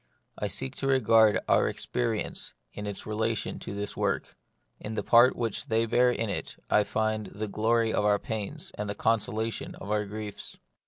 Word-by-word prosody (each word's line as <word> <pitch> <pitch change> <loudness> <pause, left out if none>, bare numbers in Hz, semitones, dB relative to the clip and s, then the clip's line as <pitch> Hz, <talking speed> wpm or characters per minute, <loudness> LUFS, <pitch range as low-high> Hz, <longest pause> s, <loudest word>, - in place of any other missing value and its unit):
I 105 - -2
seek 130 +5 -2
to 135 - -2
regard 115 -5 +5
all - - +5
our - - +2
experience 115 -3 -2 0.2
in 105 0 -5
its 100 -1 -6
relation 110 0 -1
to - - -6
this 100 0 -4
work; - - -1 0.4
in 110 +1 -5
the - - -1
part 120 +2 +6
which 115 -3 -2
they 115 +1 +2
bear 120 +2 +4
in 115 -2 -1
it 100 - -4
I 105 - +5
find 110 -1 -1
the 105 +3 -5
glory 110 +2 +1
of - - +1
our 105 0 +4
pains 105 -1 -4
and 105 0 -2
the 100 - -2
consolation 110 0 -1
of 100 - -7
our 105 0 +1
griefs. 105 0 -7
110 Hz, 190 wpm, -28 LUFS, 105-115 Hz, 0.4 s, part